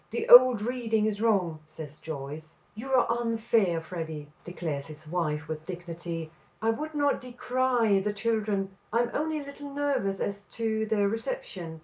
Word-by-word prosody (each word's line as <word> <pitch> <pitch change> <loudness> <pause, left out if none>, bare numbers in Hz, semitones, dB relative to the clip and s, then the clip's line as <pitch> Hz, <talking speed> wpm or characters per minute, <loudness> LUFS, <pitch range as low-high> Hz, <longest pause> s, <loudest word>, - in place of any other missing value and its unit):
The 235 - -3
old 245 -3 +9
reading 225 -3 0
is 210 -1 -1
wrong," 190 -8 +2
says 155 -1 -10
Joyce. 155 +1 -7 0.2
"You 225 +5 -7
are 255 -2 +5 0.2
unfair, 225 -6 +2
Freddy," 160 -3 -6
declares 160 -5 -4
his 155 0 -11
wife 155 -2 -1
with 155 0 -6
dignity; 170 -2 -5 0.3
"I 225 +1 +2
would 305 +7 -4
not 285 -1 +2
decry 245 -3 +1
the 205 +2 -1
children. 205 -3 -1 0.2
I 230 +2 +3
am 240 0 -1
only 315 +1 0
a - - -6
little 280 0 -9
nervous 275 -9 0
as 200 0 -3
to 220 -1 -1
their 205 -2 +2
reception. 200 - -4
205 Hz, 160 wpm, -28 LUFS, 165-240 Hz, 0.3 s, old